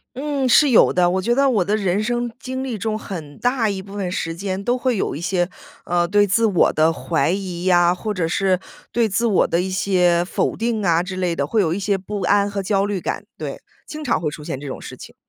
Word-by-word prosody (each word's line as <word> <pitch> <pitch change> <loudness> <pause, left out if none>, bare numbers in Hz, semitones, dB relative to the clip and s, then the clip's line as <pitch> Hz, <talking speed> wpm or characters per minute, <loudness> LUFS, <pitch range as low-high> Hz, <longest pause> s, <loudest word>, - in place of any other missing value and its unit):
嗯， 275 -1 -1
是 285 +4 +5
有 230 - +6
的。 175 -1 +3
我 190 +1 0
觉 235 +5 +2
得 275 +1 +3
我 205 -8 +2
的 205 +3 +1
人 195 -1 0
生 240 +1 -1
经 260 0 -4
历 235 -5 -4
中 215 +2 -2
很 160 -9 -8
大 245 -1 +1
一 195 -2 -3
部 200 +1 -12
分 195 -3 -3
时 165 -2 -3
间 190 +2 -4
都 245 - +1
会 250 -2 0
有 - - -1
一 145 - -6
些， 175 0 0 0.4
呃， 175 0 +1
对 205 +2 +4
自 225 +4 +2
我 195 -5 +3
的 160 +1 +3
怀 135 +2 0
疑 180 -2 -3
呀， 175 -1 +4
或 210 +3 -4
者 175 -4 0
是 185 +2 +1 0.3
对 235 -2 +1
自 225 +5 0
我 205 -5 +3
的 170 - 0
一 190 +1 -2
些 180 -2 +2
否 180 - -1
定 225 -2 -1
啊 170 -2 +3
之 185 +1 -6
类 180 -2 -1
的， 140 - 0
会 215 +8 +1
有 165 -4 +1
一 - - -3
些 200 0 0
不 200 +1 -5
安 200 +2 +2
和 200 -1 -3
焦 195 0 +1
虑 205 -2 -2
感。 - - -4
对， - - -6 0.3
经 305 0 -7
常 255 - 0
会 155 -3 -1
出 150 - -9
现 135 -3 -5
这 145 - -8
种 130 - -6
事 - - -9
情。 - - -12
195 Hz, 270 characters per minute, -21 LUFS, 175-220 Hz, 0.4 s, 有